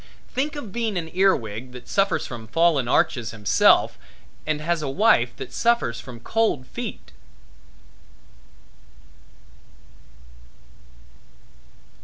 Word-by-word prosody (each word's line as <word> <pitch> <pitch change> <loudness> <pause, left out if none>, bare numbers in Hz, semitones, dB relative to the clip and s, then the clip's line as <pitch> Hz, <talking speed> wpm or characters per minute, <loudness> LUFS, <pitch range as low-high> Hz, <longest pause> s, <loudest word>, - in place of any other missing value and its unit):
Think 280 +4 -1
of 235 -9 -7
being 225 -2 -2
an 160 -2 -4
ear 190 +1 +4
wig, 115 +3 -7
that 125 0 -11
suffers 195 0 +1
from 115 -3 -8
fallen 160 -1 +2
arches 120 -2 +1
himself 105 -3 +3 0.5
and 155 -1 0
has 165 +1 -1
a 145 - -3
wife 135 - +3
that - - -8
suffers 235 - +1
from 125 -3 -10
cold 220 - 0
feet! 60 - -7
150 Hz, 105 wpm, -23 LUFS, 120-195 Hz, 0.5 s, ear